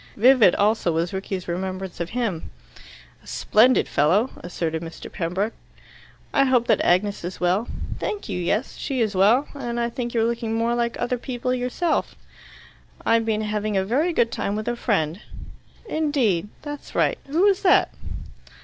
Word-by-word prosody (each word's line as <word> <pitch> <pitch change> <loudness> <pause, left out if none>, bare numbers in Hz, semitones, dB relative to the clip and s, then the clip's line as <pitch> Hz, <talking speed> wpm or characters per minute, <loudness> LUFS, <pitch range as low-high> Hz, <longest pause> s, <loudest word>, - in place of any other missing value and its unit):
Vivid 240 -4 +6
also 210 -3 +2
was 165 +2 -1
Rickie's 190 -1 -4
remembrance 185 +1 -4
of 170 0 -3
him. 220 -8 -2 0.7
"A - - -20
splendid 240 +4 +3
fellow," 185 - +2
asserted 165 -2 -3
Mr. 165 -1 -9
Pembroke. 185 +6 -2 0.8
"I 275 - +4
hope 250 -3 +3
that - - +3
Agnes 200 +3 +2
is 180 +2 -5
well." 180 +6 +1 0.3
"Thank 415 - -3
you, - - -3
yes; 210 +8 -1
she 270 -3 -3
is 220 -3 +1
well. 215 +9 +4
And 240 -4 -4
I 235 0 -1
think 240 0 -4
you're 225 - +3
looking 230 -1 -1
more 230 +1 +1
like 235 -1 -1
other 245 0 -1
people 250 0 -2
yourself." 255 +7 -1 0.9
"I've 230 0 +3
been 215 -1 +1
having 210 -1 -1
a 190 - +1
very 285 - +1
good 235 -8 +2
time 200 - -2
with 215 +1 -4
a 240 - 0
friend." 190 -7 -1 0.7
"Indeed. 275 - +1 0.2
That's 290 -1 -8
right. - - +2
Who 320 +6 +1
was 400 -1 +4
that?" 370 - +4
225 Hz, 165 wpm, -23 LUFS, 190-250 Hz, 0.9 s, Vivid